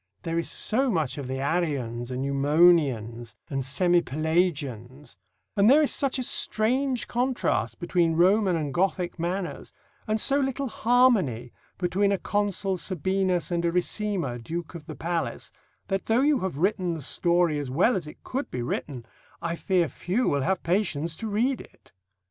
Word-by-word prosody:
There 165 0 -1
is 170 - -1
so 260 +5 +1
much 155 - -1
of 135 - -5
the 130 +1 -3
Arians 135 -6 -2
and 130 +1 -3
Eumonians, 140 -6 +2 0.2
and 135 -1 -1
semi 175 +6 +3
Pelagians; 150 -5 -2 0.4
and 205 +1 +5
there 300 +4 +6
is 290 - +2
such 275 -2 +1
a 255 - -2
strange 250 +3 +1
contrast 250 +1 -1
between 175 -2 +1
Roman 185 +2 +3
and 150 -4 -2
Gothic 180 0 -1
manners, 175 -3 -3 0.4
and 215 0 0
so 275 +5 +3
little 270 0 -1
harmony 215 - +2 0.2
between 190 +3 +1
a 200 - +2
Consul 200 -1 -1
Sabinus 185 0 0
and 170 0 0
a 170 - +1
Ricimer, 180 - -1
Duke 165 +8 -5
of 165 -3 -10
the 155 - -7
palace, 165 +3 -3 0.4
that 195 -1 -2
though 225 +3 +3
you 290 -1 +3
have 185 -9 -3
written 185 0 0
the 155 - -7
story 170 0 +1
as 140 -3 -5
well 180 - +3
as 175 -5 -3
it 150 - -12
could 270 +3 -4
be 125 - -4
written, 125 0 -4 0.3
I 170 0 -3
fear 180 -1 +1
few 195 - -1
will 140 - +1
have 185 +6 -1
patience 170 -3 0
to 225 - -5
read 235 +6 0
it." - - -19
175 Hz, 165 wpm, -26 LUFS, 145-205 Hz, 0.4 s, there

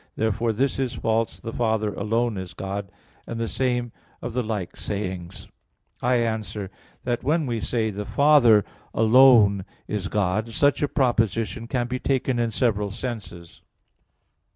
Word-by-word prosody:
Therefore 110 +1 0
this 130 +5 0
is 130 -2 -1
false, 110 +1 -1
The 115 0 -7
Father 110 -3 0
alone 115 +2 0
is 95 -2 -7
God; 95 0 -5 0.4
and 115 - -5
the 115 - -1
same 120 -1 -1 0.3
of 120 - -6
the 125 - 0
like 110 -5 -4
sayings. 95 -4 -5 0.5
I 125 +1 +2
answer 110 -4 -2 0.3
that, 120 -1 -2
When 155 +1 +1
we 120 -3 -2
say, 110 0 -1
"The 105 +1 -4
Father 125 -5 +5 0.3
alone 110 -4 +6 0.2
is 105 -3 -2
God," 105 +3 0
such 140 +5 +2
a 145 - +2
proposition 115 -4 0
can 120 +1 -1
be 130 +1 -3
taken 130 -2 0
in 120 -1 +1
several 105 -3 0
senses. 100 -6 -7
115 Hz, 150 wpm, -24 LUFS, 105-125 Hz, 0.5 s, alone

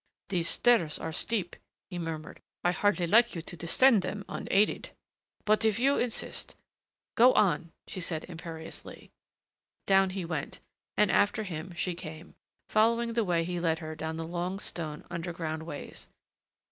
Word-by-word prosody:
"These 175 -3 +1
stairs 195 -11 +3
are 160 - -4
steep," 185 +1 -1 0.4
he 175 - -4
murmured. 160 -2 -5 0.2
"I 175 - +4
hardly 195 -1 +2
like 230 +6 +5
you 165 - -4
to 175 - -6
descend 205 - +5
them 200 +1 -4
unaided, 205 +2 +1 0.6
but 215 +1 +3
if 220 -2 +3
you 275 +4 +3
insist 240 -2 -2 0.3
" - - -63
"Go 250 +3 +7
on," 175 -5 +2
she 185 - -6
said 165 -2 -3
imperiously. 165 -2 -9 0.7
Down 195 -1 +5
he 185 -1 -4
went, 160 -4 -4 0.4
and 210 -2 +4
after 215 +2 +3
him 175 -2 -6
she 180 +2 -1
came, 160 0 -9 0.3
following 230 +2 +3
the 230 0 +2
way 175 -4 +1
he 175 +1 -3
led 165 -2 +1
her 155 -1 -6
down 160 +1 -4
the 165 - -3
long 175 +3 -3
stone 160 -6 -5
underground 165 -2 -4
ways. 145 - -8
175 Hz, 160 wpm, -30 LUFS, 165-210 Hz, 0.7 s, Go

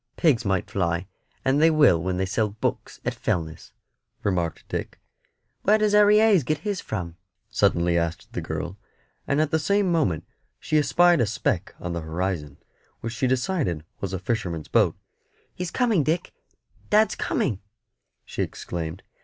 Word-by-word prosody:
"Pigs 140 -9 +3
might 100 -1 -1
fly, 85 -4 0 0.4
and 135 +3 +3
they 165 - +7
will 145 - +5
when 90 +1 -1
they 95 - +1
sells 105 +2 -1
books 110 - -3
at - - 0
Fellness," 80 -2 -3 0.5
remarked 90 -4 -1
Dick. - - -5 0.6
"Where 210 +2 +4
does 215 -1 +2
Harry 210 0 +6
Hayes 215 -7 +5
get 155 +4 0
his 205 -4 -1
from?" 85 -5 -5 0.3
suddenly 85 0 +2
asked 85 0 -4
the - - -2
girl; 95 +3 -5 0.5
and 140 - +1
at 155 -1 +1
the 160 - +2
same 200 +3 +2
moment 145 - +1 0.3
she 155 -1 +1
espied 170 +3 +4
a 115 - +2
speck 100 -3 -1
on 90 -1 -4
the 85 - -3
horizon, 80 -3 -3 0.4
which 115 0 -4
she 130 +1 0
decided 130 - 0
was 100 - -3
a 95 - -2
fisherman's 90 -5 -3
boat. - - +3 0.6
"He's 180 -1 -4
coming, 225 -4 +2
Dick, 160 +5 -1 0.6
dad's 215 0 +4
coming," 105 -7 -1 0.6
she - - -4
exclaimed. 85 +1 -4
110 Hz, 160 wpm, -25 LUFS, -, 0.6 s, they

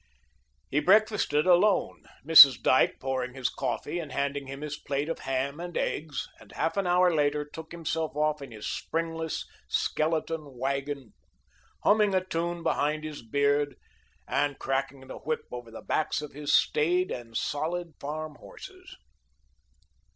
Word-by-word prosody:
He 140 - +3
breakfasted 195 -3 +3
alone, 185 +3 +3 0.2
Mrs. 145 -5 +10
Dyke 130 - +3
pouring 130 -1 -3
his 130 -2 -1
coffee 170 +4 -3
and 155 -5 -6
handing 140 +1 -2
him 135 +1 -7
his 150 -1 -4
plate 140 0 -3
of 165 - -3
ham 135 +3 -2
and 175 0 -5
eggs, 150 -2 -2
and - - -16
half 165 - -1
an 195 -2 0
hour 180 0 +4
later 150 -1 +1
took 160 +2 -10
himself 160 -2 -3
off 150 0 0
in 135 - -8
his 110 -2 -8
springless, 165 -1 -3 0.2
skeleton 155 -3 -1
wagon, 140 -1 -3 0.7
humming 210 -2 +4
a 185 0 +1
tune 170 -1 -3
behind 155 +1 0
his 155 -1 -6
beard 140 +4 +1 0.5
and 145 -1 0
cracking 135 0 -2
the 130 - -9
whip 155 0 -2
over 120 -1 -7
the 115 - -10
backs 155 -1 -1
of 150 - -7
his 145 +1 -3
staid 175 +6 +2
and 115 -2 -5
solid 165 +3 -2
farm 155 +1 -5
horses. - - -12
150 Hz, 150 wpm, -28 LUFS, 140-165 Hz, 0.7 s, Mrs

